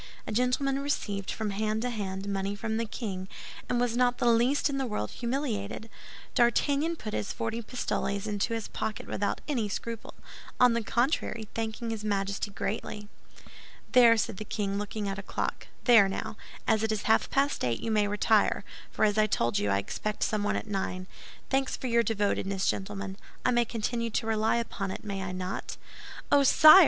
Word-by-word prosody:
A - - -5
gentleman 250 +4 +1
received, 205 -8 -2
from 215 -2 -2
hand 215 +2 -1
to 250 - -1
hand, 195 -3 -4
money 195 0 -1
from 220 +2 -2
the 230 - 0
king, 195 -4 -5 0.4
and 245 - +1
was 240 -1 +1
not 245 0 +3
the - - 0
least 240 +6 +3
in 275 -2 -1
the 265 - 0
world 105 - -2
humiliated. 235 -4 -3 0.4
D'Artagnan 285 +7 +3
put 215 -9 -6
his 200 - -2
forty 230 0 -3
pistoles 205 -4 -2
into 210 +2 -1
his 225 - -3
pocket 220 0 -4
without 200 +1 -2
any 240 -8 0
scruple—on 230 +3 -1
the 235 - +1
contrary, 235 -2 0
thanking 225 +1 -3
his 220 -2 -4
Majesty 200 -1 -1
greatly. 210 +1 -4 0.8
"There," 235 -3 +7
said 220 -2 -1
the 215 - -4
king, 200 -1 -2
looking 205 0 -3
at 195 0 -3
a - - -3
clock, - - -3 0.2
"there, 225 -6 +7
now, 195 - -4 0.3
as 220 - +3
it 220 0 +1
is 215 -1 -1
half 220 - +3
past 280 +1 +1
eight, 120 -2 0
you 225 - -2
may 210 -1 +3
retire; 210 +1 +3 0.3
for - - +2
as 210 0 +2
I 215 - +5
told 120 - +1
you, 105 - 0
I 100 - +3
expect 210 - -2
someone 210 -1 +1
at - - -2
nine. 190 -3 -2 0.5
Thanks 270 -1 +1
for - - -7
your 235 -1 +4
devotedness, 200 -3 0
gentlemen. 195 0 -2 0.3
I - - +4
may 240 -1 +3
continue 230 +1 -2
to 220 - -1
rely 220 0 +2
upon 225 -4 -2
it, - - -5
may 200 -2 -3
I 190 -1 -3
not?" 185 0 -4 0.5
"Oh, 285 - +7
sire!" 310 +6 +9
220 Hz, 185 wpm, -29 LUFS, 200-240 Hz, 0.8 s, sire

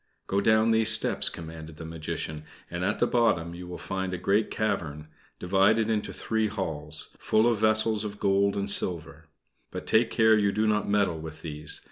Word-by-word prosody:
"Go 100 +1 0
down 110 +2 +4
these 110 0 +3
steps," 110 - +1
commanded 80 -1 -9
the 80 - -8
Magician, 80 -1 -5 0.3
"and 85 +1 -3
at 100 +3 0
the - - +2
bottom 100 -9 +1
you 90 +1 -9
will 90 0 -7
find 95 -1 -3
a - - -4
great 100 +4 +1
cavern, 75 -8 -3 0.3
divided 100 +5 +2
into 105 -1 -1
three 110 -1 -1
halls, 80 -7 -4
full 110 +1 +2
of 115 -3 +1
vessels 110 0 +2
of 105 -1 -6
gold 100 0 +2
and 100 0 -1
silver; 80 -5 0 0.4
but - - -7
take 110 +1 +3
care 110 -1 +4
you 100 -2 +2
do 105 +2 0
not 105 -1 +1
meddle 100 -5 +1
with 80 0 -9
these. 75 -2 -2
100 Hz, 185 wpm, -27 LUFS, 80-110 Hz, 0.4 s, down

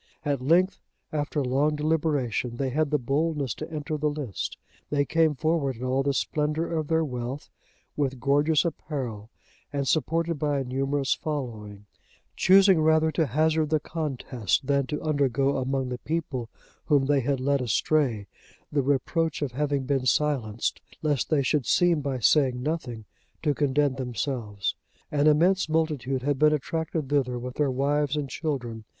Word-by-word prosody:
At 140 -3 0
length, 180 +7 +3 0.3
after 145 -1 -1
long 140 +4 +1
deliberation, 150 -6 0
they 135 -1 -1
had 155 +2 +1
the 150 - +2
boldness 140 0 -1
to - - -7
enter 155 0 -3
the 150 0 +1
lists.(94) 145 -9 -6
They 145 -1 +1
came 160 -1 +2
forward 150 -3 0
in 120 - -8
all 130 +1 +1
the 140 0 0
splendour 150 +4 0
of 160 -3 -1
their 160 0 +2
wealth, 125 +1 -5 0.4
with 135 -3 -1
gorgeous 145 +5 +3
apparel, 130 -10 -4 0.4
and 140 -1 -2
supported 165 +2 0
by 145 -1 0
a - - -1
numerous 135 +2 0
following; 110 -9 -5 0.5
choosing 190 -2 +6
rather 160 0 +3
to 160 -1 +1
hazard 155 +4 +1
the 155 -1 +2
contest, 135 - -2
than 140 -1 +1
to 150 - -4
undergo 140 -3 +1
among 130 0 -1
the 125 -1 -4
people 145 -7 -3 0.4
whom 145 -3 +3
they 145 0 +3
had 135 +1 0
led 140 +1 +1
astray, 120 -1 +1 0.5
the 145 - +2
reproach 145 +4 0
of 140 - -2
having 140 +1 -1
been 135 -1 0
silenced, 125 -7 0 0.2
lest 145 -4 0
they 150 -3 +2
should 135 -3 0
seem 175 -4 +3
by 135 -2 -2
saying 125 0 +3
nothing 125 -8 -3 0.4
to 150 -2 +2
condemn 145 -1 +1
themselves. 120 -5 -3 0.4
An 145 0 +2
immense 170 +4 +3
multitude 150 -5 0
had 145 -1 0
been 155 0 +5
attracted 160 0 -2
thither 130 -4 +1
with 125 +1 -6
their 145 -2 +2
wives 140 +2 +1
and 145 -2 -2
children. 125 -7 -4
145 Hz, 160 wpm, -26 LUFS, 130-155 Hz, 0.5 s, choosing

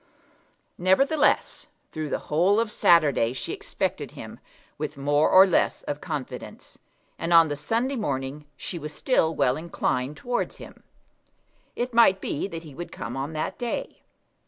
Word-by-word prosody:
Nevertheless, 270 - +2 0.2
through 155 -1 -4
the - - 0
whole 180 +7 +4
of 230 -2 0
Saturday 145 - +4
she 130 - -5
expected - - -3
him - - -9 0.4
with - - -4
more 145 +2 +2
or 190 +1 +8
less 185 - +1
of 145 0 -4
confidence, 150 -6 -6 0.4
and 165 - -2
on 165 -2 +7
the 145 - -2
Sunday 230 - -1
morning 140 - -3
she 175 - -5
was 150 0 -7
still 165 -11 +1
well 135 -2 +2
inclined 150 -3 -2
towards 245 +6 -2
him. - - -12 0.9
It 245 0 -3
might 230 -5 +5
be 145 - -3
that 165 -4 -7
he 150 -3 -11
would 175 +5 -7
come 115 +2 -6
on 140 +4 -4
that 155 +9 -3
day. 240 -1 -4
160 Hz, 155 wpm, -25 LUFS, 145-195 Hz, 0.9 s, or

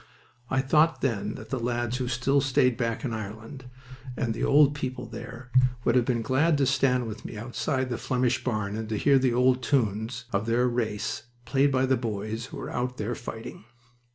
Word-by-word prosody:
I 130 - +2
thought 155 +4 +3
then 105 -5 -1
that - - -10
the 130 - -1
lads 120 0 -1
who 125 -1 -2
still 130 +3 +2
stayed 125 -2 +3
back 115 +3 -2
in 120 - -2
Ireland, 110 +5 -7 0.5
and 115 -2 0
the - - -4
old 145 0 +5
people 130 -4 -4
there, 120 +2 -9 0.3
would 120 - +3
have 125 -1 +3
been 120 -3 0
glad 145 +7 +2
to 140 - +3
stand 130 -1 +2
with 110 -1 -7
me - - -7
outside 130 +3 -2
that 120 - -2
Flemish 125 -1 0
barn 110 -4 -1
and 110 0 -4
to 110 - -1
hear 140 +4 +4
the 130 -2 +2
old 125 +1 +3
tunes 115 -1 0
of 100 +2 0
their 120 +2 +3
race 115 -2 -2 0.2
played 140 +2 +3
by 130 0 +2
the 130 0 +2
boys 110 0 -4
who - - -9
were - - -6
out 125 +1 -2
there 110 +3 -2
fighting. 115 -1 -8
125 Hz, 200 wpm, -27 LUFS, 115-130 Hz, 0.5 s, old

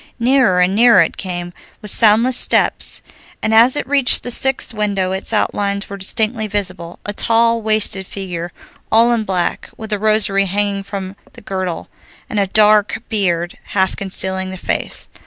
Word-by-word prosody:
Nearer 245 -6 +2
and 180 +1 +2
nearer 230 -3 +5
it - - -5
came, 175 -2 -6 0.3
with 210 - -6
soundless 230 +3 +3
steps, - - +3 0.4
and 220 - 0
as 235 +4 +5
it - - -3
reached 275 -2 +4
the 245 - -4
sixth 265 0 0
window 200 -3 -1
its 190 +3 -3
outlines 200 -2 -1
were - - -4
distinctly 215 +3 -1
visible. 185 -4 -4
A 205 - -3
tall, 230 +1 +2
wasted 215 -3 0
figure, 175 -3 -6 0.4
all 230 +2 +4
in 225 -2 -1
black, 185 -3 -2
with 220 -1 -6
a 205 - -1
rosary 210 -2 +1
hanging 200 +1 -1
from 195 -1 -7 0.2
the - - -14
girdle, 185 -3 -4 0.4
and 210 - -1
a 200 - +1
dark 210 +2 +3
beard 175 -6 -1
half 190 -1 0
concealing 190 -1 -2
the 190 - -7
face. - - -3
205 Hz, 165 wpm, -17 LUFS, 190-220 Hz, 0.4 s, nearer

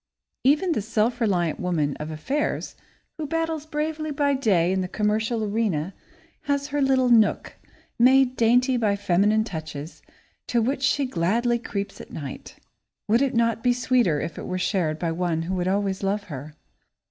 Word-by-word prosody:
Even 300 +7 +3
the 270 - 0
self 225 +3 0
reliant 175 -7 +1
woman 155 -6 0
of 150 +1 -6
affairs 265 - -2 0.4
who 305 - -3
battles 325 -1 -2
bravely 310 +1 -3
by 285 -1 +1
day 195 -10 +2
in 190 0 0
the 185 - -2
commercial 215 +3 0
arena 200 -6 -1 0.5
has 285 0 -1
her 290 0 -1
little 260 -2 +3
nook, 220 -4 +3 0.4
made 260 +1 +5
dainty 245 +3 +3
by 210 -4 +1
feminine 205 +2 +2
touches, 155 -6 -7 0.5
to 240 - +1
which 260 +4 0
she 275 +1 +2
gladly 235 +4 0
creeps 200 -3 -5
at - - -12
night. 140 -4 -8 0.5
Would 230 +4 +3
it 275 -2 +1
not 230 -1 +1
be 245 0 +3
sweeter 240 - +2
if 155 - -5
it - - -6
were 185 - -2
shared 180 -4 0
by 165 0 -2
one 165 -1 -1
who 180 +3 -3
would 180 -1 -1
always 195 0 0
love 200 +1 -1
her? 150 -3 -8
220 Hz, 170 wpm, -24 LUFS, 180-260 Hz, 0.5 s, made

